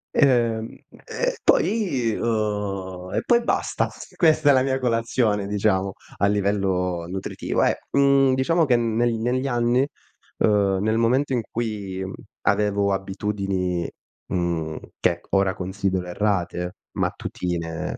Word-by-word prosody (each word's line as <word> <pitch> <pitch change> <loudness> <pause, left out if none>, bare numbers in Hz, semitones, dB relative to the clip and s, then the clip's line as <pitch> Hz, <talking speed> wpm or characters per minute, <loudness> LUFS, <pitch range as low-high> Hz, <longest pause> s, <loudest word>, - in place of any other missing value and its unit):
Ehm, 115 -5 +2 0.3
e - - -2
poi 185 - +2
uhm 100 -5 -2
e - - +1
poi 240 0 +4
basta. - - 0 0.3
Questa 155 -4 +4
è 140 - +8
la 130 - +4
mia 130 0 0
colazione 115 -4 +1
diciamo 100 -2 +1 0.2
a 100 - +3
livello 95 -4 0
nutritivo, 95 +2 -2
eh. - - +1
Mhmm, 140 -1 +4
diciamo 165 +6 +2
che 130 -4 +3
neg 120 +1 +1
negli 130 +3 0
anni, 120 +1 +2 0.5
uhm, 100 -3 +3
nel 110 +1 +1
momento 130 +4 +2
in 120 - +1
cui 105 -5 -3 0.4
avevo 100 -1 +2
abitudini, 95 -2 -2 0.4
mhmm, 85 -3 -2 0.2
che 85 -1 +1
ora 95 -1 +2
considero 95 0 -2
errate, 90 -2 -1 0.2
mattutine 85 -2 -3
105 Hz, 120 wpm, -23 LUFS, 95-125 Hz, 0.5 s, è